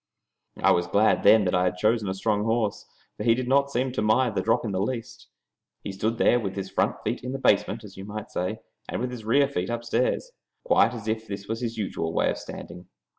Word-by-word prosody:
I - - +6
was 85 0 +2
glad 105 +4 +3
then 110 -2 +6
that 90 - 0
I 90 0 +3
had 90 - -1
chosen 110 +1 +1
a 95 - -2
strong 105 +1 0
horse, 115 -2 -1 0.3
for - - -4
he 115 0 +4
did 125 0 -3
not 140 +2 +3
seem 130 -1 -1
to 125 - -2
mind 110 +2 +2
the - - 0
drop 115 +1 +1
in 105 - -2
the 95 0 -1
least. 115 +2 -4 0.6
He - - -4
stood 110 +4 -2
there 120 - +4
with 100 -4 -4
his 95 -1 -5
front - - +1
feet - - -2
in 125 +1 -4
the - - -2
basement, 110 -2 +2
as 100 -2 -12
you 95 - -7
might 105 +1 -7
say, 95 +5 -3 0.3
and - - -3
with 125 +1 -2
his 120 -3 -8
rear 140 +5 +4
feet 95 -9 -3
upstairs, 120 - -1 0.3
quite - - +3
as 110 -2 -8
if 110 0 -2
that 100 0 -6
was 115 +2 -3
his 115 -1 -3
usual 85 -6 -3
way - - +2
of - - -5
standing. 90 +1 -9
110 Hz, 240 wpm, -26 LUFS, 100-120 Hz, 0.6 s, I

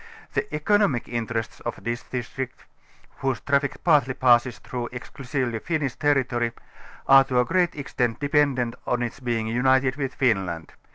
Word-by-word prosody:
The 210 - -1
economical 150 - +1
interests 115 -1 -3
of 120 -4 -6
this 120 +3 -2
district, 125 +1 -6 0.5
whose 135 -2 -1
traffic 140 0 0
partly 145 -6 +3
passes 125 -1 +4
through 120 -1 -5
exclusively 125 -1 -3
Finnish 150 -2 -1
territory, 130 -5 +1 0.5
are 135 0 +8
to 130 -2 +1
a 125 - +3
great 175 +1 +1
extent 125 -5 -2
dependent 140 -5 +2
on 125 0 +1
its 120 - -5
being 120 -4 -1
united 130 +3 +2
with 135 -2 -3
Finland. 95 -10 0
130 Hz, 145 wpm, -25 LUFS, 120-140 Hz, 0.5 s, are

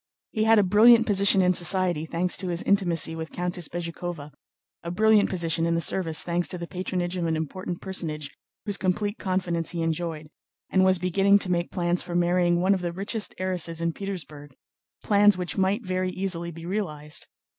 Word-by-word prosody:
He 215 0 0
had 225 0 +5
a 205 - +5
brilliant 225 +5 +6
position 200 -2 +4
in 180 0 +3
society 175 -3 +1
thanks 175 +2 0
to 190 - -3
his 175 -1 -2
intimacy 175 -5 +1
with 160 0 -6
Countess 175 -2 -4
Bezúkhova, 170 -3 -6 0.5
a 170 - -6
brilliant 215 +3 +3
position 165 -2 0
in 170 - +1
the - - +1
service 165 -1 +1
thanks 175 0 0
to 180 - -3
the 170 - -6
patronage 180 0 -3
of 170 -2 -1
an 160 - 0
important 175 +3 -5
personage 155 -6 -4 0.3
whose 205 -2 0
complete 205 +3 -1
confidence 180 -4 -1
he 170 -2 -3
enjoyed, 160 -2 -3 0.4
and 190 - +3
he - - +4
was 185 0 +4
beginning 195 +3 +3
to 190 -2 -2
make 175 0 -1
plans 175 -1 -1
for 175 - -6
marrying 175 0 +2
one 190 +2 +3
of 190 - -2
the 175 -1 -2
richest 200 +3 -3
heiresses 180 -3 -1
in 170 0 -1
Petersburg, 155 -8 -8 0.5
plans 205 -1 +4
which 180 -1 -4
might 200 +4 0
very 185 0 -1
easily 180 -2 -2
be 165 0 -10
realized. 155 -6 -4
180 Hz, 190 wpm, -25 LUFS, 170-190 Hz, 0.5 s, brilliant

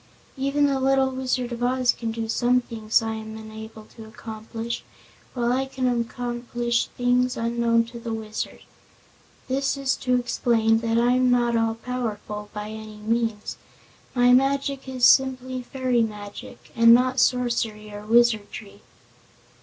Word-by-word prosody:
Even 275 +1 +1
the 275 -1 +1
little 265 0 +2
Wizard 255 -1 -2
of 240 0 -5
Oz 250 0 +2
can 230 -1 -4
do 225 0 -4
some 245 +2 +2
things 225 -2 0
I 225 0 -2
am 220 0 -7
unable 220 0 -10
to 225 - -10
accomplish, 225 +1 -6 0.5
while 240 -1 +1
I 265 +1 0
can 265 -1 -3 0.2
accomplish 240 0 -2
things 245 0 +2
unknown 230 0 +1
to 235 +1 -10
the 230 -1 -5
Wizard. 220 -1 -5 0.9
This 275 +2 0
is 275 -1 0
to 250 -1 +1
explain 230 -2 +2
that 230 0 0
I'm 250 +2 +3
not 240 -1 +2
all 225 0 +1
powerful, 220 -4 -5
by 210 0 -6
any 215 -1 -9
means. 225 0 -2 0.6
My 245 0 +5
magic 275 +1 +1
is 255 -2 +2
simply 260 -1 +3
fairy 250 -1 0
magic, 210 -2 -6
and 230 0 +8
not 255 +1 +1
sorcery 230 -4 0
or 205 0 -8
wizardry." 220 -2 +1
235 Hz, 145 wpm, -24 LUFS, 225-255 Hz, 0.9 s, and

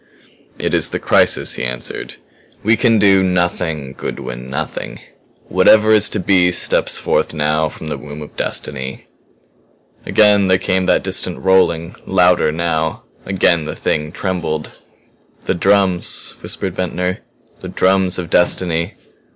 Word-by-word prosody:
"It - - -2
is - - +2
the - - -2
crisis," - - +2
he - - -4
answered. 60 0 -5 0.5
"We 110 +2 +4
can 115 -2 +3
do 100 -2 +5
nothing, 85 -6 -1
Goodwin 65 -1 -6
nothing. 75 +3 -5 0.5
Whatever 110 0 +4
is 105 -1 +5
to 105 - -1
be 90 -1 +3
steps 90 - +1
forth - - -1
now 75 +1 +1
from 80 - -11
the 75 - -4
womb 75 0 -9
of 75 - -14
Destiny." 65 +1 -5 1.0
Again 105 -2 +4
there 95 0 +4
came 95 0 -1
that - - +2
distant - - -1
rolling 90 -3 +1
louder, 90 -4 +3
now. 80 -1 -2 0.2
Again 90 -4 +2
the 75 - -5
Thing 75 0 -1
trembled. 85 -5 -3 0.7
"The - - +1
drums," 95 -1 0
whispered 95 - -5
Ventnor. 90 0 -2 0.4
"The - - -7
drums 95 -1 +1
of 90 -3 -6
destiny. 90 0 +1
90 Hz, 135 wpm, -17 LUFS, 80-95 Hz, 1.0 s, do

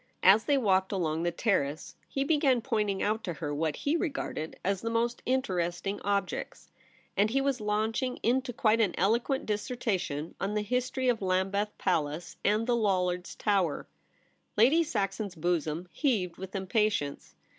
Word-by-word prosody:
As 200 +4 +7
they 285 - +3
walked 190 -6 +2
along 165 -5 -1
the 175 0 0
Terrace 155 -7 -1
he 275 - -1
began 280 -4 +3
pointing 210 -5 0
out 215 +2 0
to 180 -6 -3
her 150 -2 -4
what 155 0 -1
he 290 +3 0
regarded 275 - -3
as 195 0 0
the 230 - -2
most 235 +1 0
interesting 195 -6 -1
objects, 200 -2 -2 0.4
and 205 +2 +3
he 265 +5 +1
was 270 -3 0
launching 220 +4 0
into 255 +2 +1
quite 225 -1 +2
an 205 -5 +1
eloquent 235 - +1
dissertation 205 - -2
on 200 +2 -1
the 210 - +1
history 255 +3 -1
of 240 -3 +2
Lambeth 195 +2 0
Palace 160 -2 -1
and 210 +2 +2
the 245 0 +2
Lollards' 180 -5 0
Tower. 195 -7 0 0.7
Lady 265 +10 +6
Saxon's 200 - -2
bosom 165 0 -1
heaved 210 - 0
with 190 +1 -8
impatience. 195 -6 -1
205 Hz, 155 wpm, -29 LUFS, 180-235 Hz, 0.7 s, As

